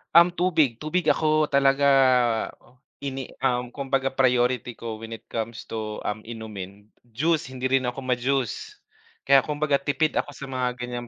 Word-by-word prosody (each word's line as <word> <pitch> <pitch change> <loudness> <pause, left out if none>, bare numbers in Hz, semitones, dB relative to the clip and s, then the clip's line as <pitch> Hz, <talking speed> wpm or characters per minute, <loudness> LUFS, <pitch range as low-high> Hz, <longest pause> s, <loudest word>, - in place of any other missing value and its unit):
Um, 170 +1 +8
tubig. 160 -9 +1
Tubig 155 +1 +1
ako 155 0 +2
talaga 140 0 +4 0.8
o 125 +1 -24 0.2
ini 135 -2 -4 0.2
um, 125 -2 +1
kumbaga 135 +1 -1
priority 125 -2 +2
ko 115 -1 -6
when 115 +1 -9
it 115 0 -9
comes 115 0 -5
to, 110 -1 -4
um, 110 +1 -3
inumin, 105 -3 -8 0.2
juice 140 +5 -1
hindi 130 0 -2
rin 135 0 +2
ako 125 +2 -3
ma-juice. 130 -1 -2 0.5
Kaya 135 -1 +6
kumbaga 150 -1 0
tipid 145 +3 0
ako 145 - -1
sa 140 - -9
mga 130 -1 -1
ganyang 120 0 -5
130 Hz, 155 wpm, -25 LUFS, 120-140 Hz, 0.8 s, Um